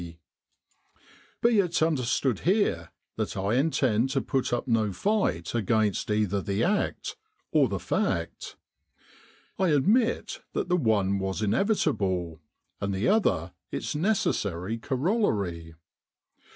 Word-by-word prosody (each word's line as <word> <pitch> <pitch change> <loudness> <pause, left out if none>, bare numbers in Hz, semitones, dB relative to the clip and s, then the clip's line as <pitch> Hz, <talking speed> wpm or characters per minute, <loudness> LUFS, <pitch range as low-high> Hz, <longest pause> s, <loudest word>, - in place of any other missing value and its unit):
C. 85 -1 -9 1.3
Be 235 -2 +4
it 180 -3 +1
understood 130 - +1
here 175 - +1 0.3
that - - -3
I 100 +3 0
intend 130 -4 +2
to 135 0 0
put 135 0 -1
up 120 +2 -1
no 110 -4 +2
fight 95 - 0
against 110 -2 +1
either 105 -2 +1
the 100 +2 -1
act 205 +4 -1 0.3
or - - +4
the - - -2
fact. - - -2 1.0
I 190 - +3
admit 210 - +2
that - - -2
the 180 - +3
one 105 - +1
was 95 +2 -2
inevitable, 100 - 0 0.4
and 100 -1 -2
the 95 - +1
other 145 - +1 0.2
its - - -3
necessary 115 - -1
corol 165 - 0
lary. 85 -5 -4
115 Hz, 125 wpm, -27 LUFS, -, 1.3 s, Be